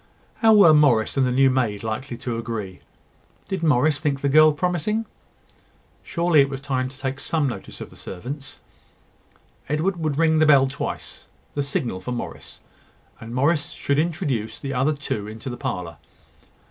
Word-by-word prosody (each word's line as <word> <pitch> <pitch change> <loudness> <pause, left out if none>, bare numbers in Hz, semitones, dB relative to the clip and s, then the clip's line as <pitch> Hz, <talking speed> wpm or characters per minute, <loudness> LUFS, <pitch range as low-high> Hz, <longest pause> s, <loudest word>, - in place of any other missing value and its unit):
How 220 -1 +5
were 185 -7 +8
Morris 135 -8 +4
and 135 -2 +2
the - - 0
new 135 +1 +4
maid 115 -6 -1
likely 115 +3 -4
to 120 -1 -4
agree? 110 -5 -5 0.7
Did 190 -3 -3
Morris 150 -1 +3
think 140 -2 -1
the 140 - +1
girl 155 +2 +7
promising? 180 +7 -1 1.0
Surely 170 -3 +3
it 135 - +2
was 135 -1 -5
time 130 -2 -2
to 130 - -14
take 135 0 -4
some 155 -1 0
notice 125 - -7
of - - -8
the - - -15
servants. 135 +10 -8 1.1
Edward 165 +6 0
would 155 -4 -2
ring 160 -1 +3
the 155 - +4
bell 140 -3 +6
twice, 135 +1 -5 0.3
the 145 - -1
signal 130 -8 -2
for 125 +7 -5
Morris; 120 - -7 0.6
and 115 +2 -8
Morris 150 +4 +1
should 140 0 0
introduce 150 - -1
the 135 -1 -5
other 135 +4 +2
two 125 -8 -4
into 110 +4 -7
the - - -5
parlour. 85 -3 -4
140 Hz, 170 wpm, -23 LUFS, 125-155 Hz, 1.1 s, were